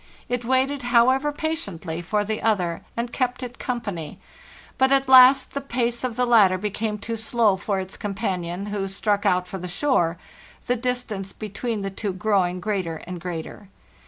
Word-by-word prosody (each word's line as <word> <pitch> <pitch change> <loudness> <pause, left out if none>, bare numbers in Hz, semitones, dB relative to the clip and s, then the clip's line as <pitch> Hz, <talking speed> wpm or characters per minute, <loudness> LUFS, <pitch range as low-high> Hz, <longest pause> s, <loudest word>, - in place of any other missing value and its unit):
It 245 0 -2
waited, 260 +3 +1
however, 255 +4 +3
patiently 200 - -4
for 205 +4 0
the 215 +1 -3
other, 185 -7 0 0.2
and 235 0 -3
kept 255 0 -1
it 245 -1 -7
company; 200 - -4 0.6
but 265 0 +4
at 275 -1 +3
last 260 +1 +7
the 280 - -2
pace 240 -2 -1
of 250 -3 -2
the 250 +1 +2
latter 210 -6 +5
became 210 +2 -2
too 230 +2 -4
slow 225 -3 +2
for 195 +1 -2
its 190 0 -6
companion, 190 -3 -3
who 195 -2 -1
struck 205 +1 0
out 180 -1 +2
for 190 - -6
the 180 - -5
shore, 175 - +1 0.5
the 245 - +1
distance 240 -6 -3
between 215 +1 -4
the 195 - -3
two 195 0 -3
growing 185 -2 +1
greater 185 -5 -2
and 180 -1 -7
greater. 175 +3 -6
215 Hz, 170 wpm, -24 LUFS, 185-245 Hz, 0.6 s, last